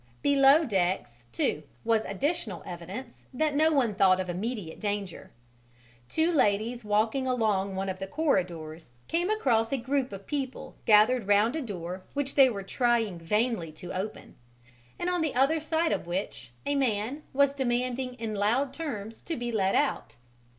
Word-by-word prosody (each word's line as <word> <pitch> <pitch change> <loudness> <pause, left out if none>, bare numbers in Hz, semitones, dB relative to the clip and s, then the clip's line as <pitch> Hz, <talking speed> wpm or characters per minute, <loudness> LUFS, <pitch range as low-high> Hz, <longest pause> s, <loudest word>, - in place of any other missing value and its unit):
Below 285 +2 +6
decks 175 - -1
too 120 +5 0 0.2
was 225 -1 +2
additional 220 - -2
evidence 190 +9 -8
that 305 +2 +1
no 310 +2 +4
one 255 -8 +2
thought 190 -2 +4
of 185 -1 -2
immediate 200 -2 -4
danger. 205 -3 -4 0.8
Two 320 +2 +2
ladies 235 -4 +1
walking 220 +5 +1
along 210 -6 +1
one 195 +1 -2
of 190 -1 -4
the 195 - -4
corridors 175 - -1 0.2
came 345 +3 0
across 240 - +2
a 275 - +1
group 265 +1 -1
of 195 0 -8
people 275 -3 -4
gathered 220 +1 +5
round 210 +6 +4
a 320 - -1
door 185 - -6
which 280 -1 -1
they 270 -2 +7
were 200 -5 -4
trying 225 -4 +1
vainly 210 0 0
to 175 +3 -8
open, 190 +3 -5 0.6
and 345 - -3
on 360 -1 +1
the 315 -5 -1
other 275 +5 +3
side 320 +1 0
of - - -2
which 175 - -4 0.2
a 285 - +1
man 255 0 0
was 280 0 +3
demanding 250 -1 -1
in 225 -2 -4
loud 235 +7 +1
terms 230 -9 -5
to 330 - -4
be 240 0 -3
let 195 -4 +1
out. 290 -1 0
230 Hz, 165 wpm, -28 LUFS, 195-275 Hz, 0.8 s, they